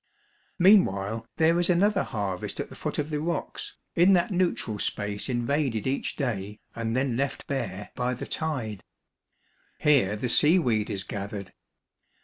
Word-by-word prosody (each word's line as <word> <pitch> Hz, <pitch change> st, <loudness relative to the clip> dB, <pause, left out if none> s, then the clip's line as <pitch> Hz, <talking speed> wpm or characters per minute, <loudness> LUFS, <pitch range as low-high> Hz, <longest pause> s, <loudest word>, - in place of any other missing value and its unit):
Meanwhile 115 Hz, -, +4 dB
there 165 Hz, +2 st, +4 dB
is 175 Hz, -, +1 dB
another 195 Hz, +4 st, +3 dB
harvest 100 Hz, -5 st, -4 dB
at -, -, -3 dB
the -, -, -11 dB
foot -, -, -4 dB
of 150 Hz, +1 st, -2 dB
the 150 Hz, -, -1 dB
rocks, 170 Hz, +3 st, -4 dB, 0.2 s
in 180 Hz, +3 st, +6 dB
that 175 Hz, +2 st, +2 dB
neutral 175 Hz, -, 0 dB
space 105 Hz, +4 st, -3 dB
invaded 125 Hz, -2 st, 0 dB
each 135 Hz, +1 st, -1 dB
day, 105 Hz, -7 st, -3 dB, 0.2 s
and 115 Hz, +1 st, -1 dB
then 130 Hz, -2 st, 0 dB
left 140 Hz, +3 st, -2 dB
bare, 120 Hz, -8 st, -4 dB
by 125 Hz, 0 st, -1 dB
the -, -, -6 dB
tide. 125 Hz, -, -3 dB, 0.9 s
Here 125 Hz, -9 st, +3 dB
the 115 Hz, +4 st, -2 dB
seaweed 125 Hz, -, +4 dB
is 95 Hz, -1 st, -2 dB
gathered. 100 Hz, -1 st, -6 dB
125 Hz, 145 wpm, -27 LUFS, 105-160 Hz, 0.9 s, in